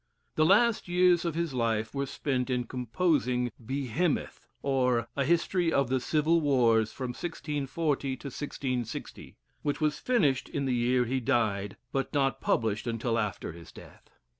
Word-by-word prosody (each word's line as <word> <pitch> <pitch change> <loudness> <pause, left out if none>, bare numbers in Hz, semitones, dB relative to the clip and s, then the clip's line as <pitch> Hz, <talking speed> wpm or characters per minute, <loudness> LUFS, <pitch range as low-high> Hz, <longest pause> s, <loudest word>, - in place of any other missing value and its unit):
The 155 0 +3
last 220 +3 +4
years 180 -1 +4
of 170 -2 -1
his 170 -3 -1
life 115 -3 0
were 140 0 -2
spent 130 -2 -2
in 125 -1 0
composing 125 0 0
"Behemoth; 140 +6 -2 0.2
or, 125 -4 +1
a 140 - +1
History 170 +2 +2
of 140 -5 +2
the 130 0 +2
Civil 155 +5 +2
Wars 115 -6 +3
from 130 -2 -5
1640 145 -1 -2
to - - -16
1660," 130 -4 -5 0.3
which 145 -1 -1
was 150 -1 0
finished 150 - +1
in 140 -1 -2
the 130 - +1
year 125 +1 +2
he 130 +3 -1
died, 105 -5 0
but 135 -1 -1
not 135 -1 +1
published 110 0 0
until 115 0 0
after 105 -5 -3
his 85 0 -12
death. - - -15
135 Hz, 155 wpm, -29 LUFS, 120-155 Hz, 0.3 s, last